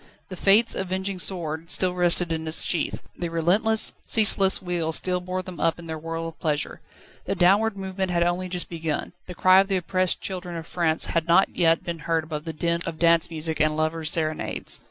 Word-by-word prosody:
The 185 - -7
Fates' 205 +5 +4
avenging 190 0 -3
sword 165 -3 -2
still 185 -1 +1
rested 175 -1 +2
in 160 0 -3
its 160 - -3
sheath; 165 -4 -2
the 175 - -4
relentless, 195 +7 +3
ceaseless 200 -3 +5
wheel 175 -3 -2
still 180 +2 0
bore 185 +1 -4
them 185 -1 -9
up 165 -1 +1
in 170 - -11
their 160 -1 -6
whirl 165 +1 -5
of 165 - -11
pleasure; 150 -3 -2 0.4
the - - -2
downward 200 +4 +3
movement 190 -1 -3
had 170 -1 +1
only 175 +1 -1
just 180 -1 -3
begun: 160 -2 -4
the 180 - -8
cry 185 +2 +5
of 195 - +2
the 195 -1 0
oppressed 185 0 0
children 180 -2 -6
of 165 -1 -6
France 165 -3 0
had 165 -1 0
not 175 +3 +3
yet 165 -2 +2
been 170 -1 -5
heard 165 +1 -1
above 155 0 -6
the 165 - -3
din 170 +2 -1
of 160 - -5
dance 170 0 +3
music 160 -1 -3
and 155 0 +1
lovers' 155 0 -1
serenades. 155 -2 -1
170 Hz, 205 wpm, -24 LUFS, 160-185 Hz, 0.4 s, ceaseless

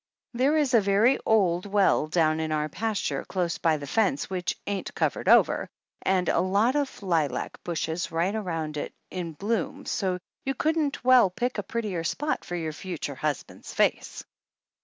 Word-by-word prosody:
There 270 +6 +2
is 285 -4 +1
a 230 - +6
very 205 +6 +3
old 185 -4 +3
well 195 -6 +3
down 155 -1 +2
in 160 0 -2
our 150 0 0
pas 215 +6 -2
ture 140 -2 -2
close 175 -3 -2
by 160 -2 +2
the 145 - -7
fence 220 - 0
which 180 -1 -2
ain't 200 -1 -4
covered - - 0
over, - - +4 0.3
and 185 -1 +1
a - - +2
lot 205 +8 +2
of 285 -7 -2
lilac 160 -8 -1
bushes 170 0 -2
right 170 +5 0
around 165 -8 -3
it - - -5 0.2
in 175 -3 -4
bloom, 235 - -2
so 185 -3 -1 0.3
you 270 0 -2
couldn't 310 -1 0
well 250 -5 +6
pick 240 +5 -2
a - - +1
prettier 200 -5 -3
spot 295 - -1
for 175 - -5
your 160 -2 -3
future 165 -3 -5
husband's 150 +1 -4
face. - - 0
190 Hz, 175 wpm, -27 LUFS, 165-230 Hz, 0.3 s, a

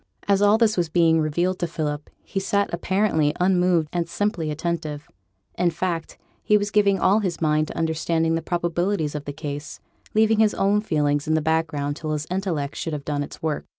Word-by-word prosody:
As 200 -1 +3
all 205 +1 +5
this 225 -2 +2
was 170 -2 +1
being 165 -1 +3
revealed 175 +5 0
to 175 - -1
Philip, 150 -3 -4
he 195 - -3
sat 200 0 0
apparently 170 -4 +1
unmoved 180 -3 +3
and 170 -1 -1
simply 185 -4 -1
attentive. 155 -1 -3 0.5
In 180 - +3
fact, 170 -1 -3 0.2
he 210 - +4
was 205 0 -2
giving 200 -2 +3
all 200 +3 +3
his 185 -5 -2
mind 155 -1 +2
to - - -8
understanding 160 0 0
the 165 - 0
probabilities 175 -1 -1
of 150 -1 -5
the 145 - -4
case, 145 0 -6 0.4
leaving 220 0 +4
his 215 -1 +3
own 200 +2 +2
feelings 145 -7 0
in 155 - +2
the - - +3
background 155 -2 -1
till 155 -1 -3
his 150 0 -2
intellect 170 -7 -2
should 165 - -3
have 145 -2 -5
done 145 -1 -1
its 145 - -8
work. 155 -2 -2
165 Hz, 195 wpm, -23 LUFS, 155-190 Hz, 0.5 s, all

